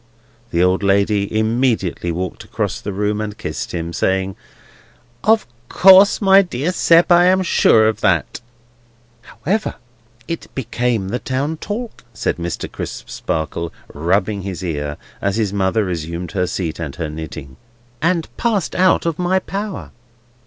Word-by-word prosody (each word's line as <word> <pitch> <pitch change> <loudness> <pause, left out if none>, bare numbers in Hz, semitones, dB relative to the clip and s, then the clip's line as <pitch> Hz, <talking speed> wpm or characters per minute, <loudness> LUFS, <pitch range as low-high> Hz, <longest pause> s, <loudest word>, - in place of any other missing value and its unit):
The 85 -4 +2
old 90 +2 +2
lady 100 +1 +2
immediately 110 -6 0
walked 90 +2 -4
across - - -3
the 100 - -4
room 105 +2 -1
and 105 -1 -5
kissed 75 - -5
him: 85 -1 -4
saying, 95 +1 0 0.9
"Of 220 0 +4 0.2
course, 190 +1 +7
my 195 -1 +6
dear 170 -2 -2
Sept, 170 -1 +4
I 175 0 +7
am 185 +1 +4
sure 110 -10 +4
of 110 0 -1
that." - - +1 0.8
"However, 195 - -2 0.5
it 165 - -4
became 120 -5 -1
the 120 +4 -2
town 140 +5 -2
talk," 220 +7 -6
said - - -1
Mr. 85 -1 -4
Crisparkle, 80 +6 -4 0.2
rubbing 95 +6 0
his 95 -1 -5
ear, 75 -4 -3 0.2
as 100 0 0
his 105 -3 0
mother 100 +2 +1
resumed 85 -1 -4
her 90 -3 0
seat, 85 -4 -3
and 75 -5 -5
her 80 - -3
knitting, 75 -3 -8 0.4
"and 165 0 +1
passed 215 -7 0
out 185 -1 +3
of 165 -1 -1
my 180 +1 +2
power." 200 +2 -4
105 Hz, 145 wpm, -19 LUFS, -, 0.9 s, course